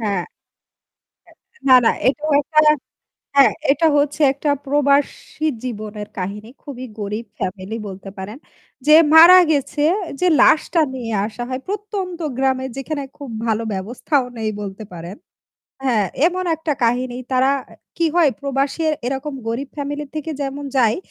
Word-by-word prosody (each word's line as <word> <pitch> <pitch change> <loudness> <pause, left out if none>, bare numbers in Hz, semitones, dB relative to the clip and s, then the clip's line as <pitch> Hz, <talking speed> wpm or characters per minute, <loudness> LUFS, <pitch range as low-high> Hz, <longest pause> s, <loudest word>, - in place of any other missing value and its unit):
হ্যাঁ 200 -5 -1 1.3
এ - - -22
না, 260 - +8
না, - - +5 0.2
এটা 285 +3 0 0.2
একটা 305 +2 +1 0.8
হ্যাঁ 280 -1 +7 0.2
এটা 325 +3 +2
হচ্ছে 290 +2 0
একটা 285 +2 -2 0.2
প্রবাসী 285 +2 0 0.2
জীবনের 215 -3 -6
কাহিনী 200 +4 -5
খুবই 255 -3 -7
গরীব 210 +3 -4
ফ্যামিলি 190 +3 -4
বলতে 195 0 -9
পারেন। 200 +5 -7 0.5
যে 305 - +8 0.2
মারা 340 +3 +10
গেছে 290 0 0 0.4
যে 365 - +2
লাশটা 325 +2 +4
নিয়ে 240 -3 -5 0.2
আসা 235 +2 -6
হয় 255 0 -4
প্রত্যন্ত 400 -3 -4 0.2
গ্রামে 265 -1 +1
যেখানে 285 +1 -4
খুব 280 -3 -8 0.2
ভালো 225 0 0
ব্যবস্থাও 245 +8 -1
নেই 220 -1 -2
বলতে 200 +1 -7
পারেন। 175 +3 -8 0.7
হ্যাঁ 225 -7 +2 0.2
এমন 365 +1 -1
একটা 320 -1 -2
কাহিনী 245 +1 0 0.2
তারা 260 +1 +3 0.2
অ্যা - - -18 0.2
কি 335 -1 +2
হয় 335 -5 +4
প্রবাসী 275 +3 -1 0.2
এরকম 270 +2 -3
গরীব 250 +5 -3
ফ্যামিলি 290 +1 -4
থেকে 310 +1 -4
যেমন 280 +1 -4
যায় 230 -3 +3
265 Hz, 140 wpm, -20 LUFS, 220-295 Hz, 1.3 s, মারা